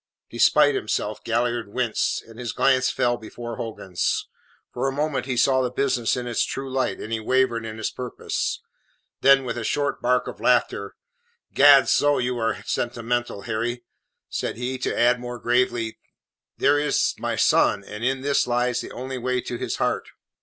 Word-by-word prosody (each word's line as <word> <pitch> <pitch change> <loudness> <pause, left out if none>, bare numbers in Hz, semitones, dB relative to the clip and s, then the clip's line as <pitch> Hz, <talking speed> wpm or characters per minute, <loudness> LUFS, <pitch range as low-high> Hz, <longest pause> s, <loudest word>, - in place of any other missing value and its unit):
Despite 445 - +4
himself, 240 - -2
Galliard 120 -1 0
winced, 125 -2 -1
and 115 +1 -14
his 120 -3 -4
glance 130 -1 +3
fell 120 0 +1
before 120 +1 -8
Hogan's. 95 -6 -2 0.5
For 125 +2 -1
a - - 0
moment 145 -1 -2
he 130 -2 -2
saw 130 +2 +4
the 125 - 0
business 125 -2 0
in 125 - -4
its 120 -2 0
true 135 0 -4
light, 130 -1 0
and 110 - -5
he 110 - 0
wavered 120 0 +1
in 110 0 -7
his 110 - -2
purpose. 125 -1 -3 0.6
Then, 135 0 +6
with 120 - -3
a - - -4
short 145 +5 -1
bark 125 +1 +1
of - - -7
laughter: - - +1 0.6
"Gadso, 145 +1 +6
you 125 0 -1
are 115 -3 -1
sentimental, 120 -2 -2
Harry!" 120 +2 -3 0.4
said - - -3
he, 125 +2 -3
to - - -2
add, 125 +1 +4
more 120 0 -6
gravely: 120 -2 0 0.6
"There 145 +1 +3
is 150 0 +1
my - - -2
son, 100 - +3
and 105 +3 -8
in 130 +1 0
this 140 -1 +1
lies 125 0 +1
the - - -8
only 130 +1 -5
way 125 +1 0
to 120 - -5
his - - -2
heart.". - - -1
125 Hz, 175 wpm, -24 LUFS, 115-130 Hz, 0.6 s, Then